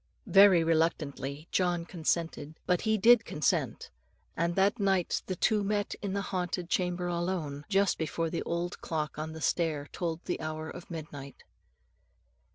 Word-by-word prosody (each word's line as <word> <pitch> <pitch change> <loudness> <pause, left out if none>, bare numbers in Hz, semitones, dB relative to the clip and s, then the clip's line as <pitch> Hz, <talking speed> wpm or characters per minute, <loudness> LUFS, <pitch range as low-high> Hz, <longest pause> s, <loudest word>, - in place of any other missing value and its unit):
'" - - -43
Very 195 -4 +7
reluctantly 155 -3 -1
John 175 -2 +1
consented; 160 -3 -2
but 180 -1 +2
he 220 -1 +2
did 230 +2 +6
consent; 150 - -1 0.4
and 170 +1 0
that 200 +4 +2
night 195 -3 +1
the 185 - -2
two 210 +3 +2
met 205 0 -1
in 200 -2 -3
the 200 0 -1
haunted 180 -2 -3
chamber 180 -1 0
alone, 170 -5 -2
just 200 -1 +2
before 160 +1 -2
the 170 - -2
old 170 +1 -3
clock 155 -2 -3
on 160 +1 -4
the 160 - -8
stair 155 -3 0
told 170 -2 -3
the - - -2
hour 155 0 -4
of 175 - -10
midnight. 145 -4 -8
170 Hz, 160 wpm, -30 LUFS, 160-190 Hz, 0.4 s, Very